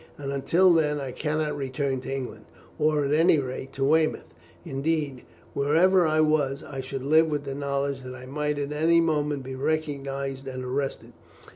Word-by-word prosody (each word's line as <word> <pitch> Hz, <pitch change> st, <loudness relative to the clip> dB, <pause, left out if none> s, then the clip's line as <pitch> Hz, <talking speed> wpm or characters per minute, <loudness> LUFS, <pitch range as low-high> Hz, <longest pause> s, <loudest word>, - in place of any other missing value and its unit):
And 140 Hz, -1 st, -4 dB
until 170 Hz, +7 st, +4 dB
then 150 Hz, -3 st, +2 dB
I 135 Hz, -2 st, -4 dB
cannot 150 Hz, +1 st, -1 dB
return 135 Hz, -1 st, -2 dB
to 130 Hz, -, -6 dB
England, 135 Hz, -2 st, -5 dB, 0.3 s
or 150 Hz, -1 st, +2 dB
at 140 Hz, -, 0 dB
any 160 Hz, +1 st, +5 dB
rate 130 Hz, -1 st, -4 dB
to 135 Hz, -, -2 dB
Weymouth; 155 Hz, +3 st, +1 dB, 0.3 s
indeed, 140 Hz, -1 st, -1 dB, 0.3 s
wherever 170 Hz, +5 st, +4 dB
I 155 Hz, 0 st, +3 dB
was, 150 Hz, -3 st, +1 dB
I 135 Hz, -1 st, -6 dB
should 130 Hz, 0 st, -5 dB
live 160 Hz, +3 st, +4 dB
with 145 Hz, -2 st, -2 dB
the 135 Hz, -1 st, -4 dB
knowledge 140 Hz, -1 st, -2 dB
that 130 Hz, 0 st, -8 dB
I 130 Hz, 0 st, -10 dB
might 150 Hz, +2 st, -2 dB
at 145 Hz, 0 st, -3 dB
any 160 Hz, +3 st, +3 dB
moment 150 Hz, -4 st, 0 dB
be 130 Hz, +1 st, -6 dB
recognized 140 Hz, -2 st, -3 dB
and 130 Hz, -1 st, -5 dB
arrested. 135 Hz, +2 st, -3 dB
145 Hz, 175 wpm, -26 LUFS, 135-155 Hz, 0.3 s, any